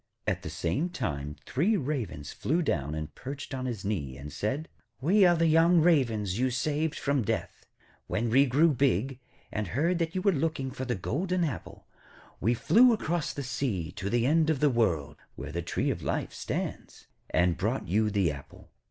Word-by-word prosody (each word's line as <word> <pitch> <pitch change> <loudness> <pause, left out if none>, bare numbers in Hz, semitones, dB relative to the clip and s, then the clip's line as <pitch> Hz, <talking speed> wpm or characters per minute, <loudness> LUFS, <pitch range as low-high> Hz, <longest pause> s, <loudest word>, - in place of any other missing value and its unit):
At - - -1
the - - -6
same 95 - -1
time 75 - -3
three 190 - +2
Ravens 125 - -3
flew 170 +5 0
down 75 - -1
and 80 0 -5
perched 140 +2 -7
on 130 -1 -3
his 110 -6 -4
knee, 70 -11 -2
and 70 +1 -8
said: 135 - -2 0.3
'We 190 +8 +4
are 175 - +5
the 165 0 +2
young 165 +2 +5
Ravens 115 - +2
you 130 +1 +2
saved 150 +5 -1
from 140 -2 +1
death. 105 - -3 0.4
When 115 +1 -1
we 135 +4 +5
grew 150 +5 +4
big, 130 -1 +1 0.3
and 110 -2 -2
heard 165 - +1
that 165 +1 -1
you 185 - -1
were 200 - +5
looking 150 -4 -1
for 130 - -5
the 125 -1 -1
golden 175 - -1
apple, 145 -8 -5 0.5
we 120 +2 +2
flew 240 - +5
across 175 -6 -1
the 140 - -5
sea 115 - -2
to 95 - -4
the 120 +2 +2
end 155 +3 +3
of 155 -4 +1
the 150 0 +4
world, 80 - 0 0.2
where - - -7
the - - -2
tree - - -1
of - - -4
life - - -2
stands, - - -5 0.2
and 90 -1 +2
brought 110 - -2
you 105 +4 +2
the 100 -6 +1
apple.' 70 -1 -12
130 Hz, 190 wpm, -29 LUFS, 100-160 Hz, 0.5 s, are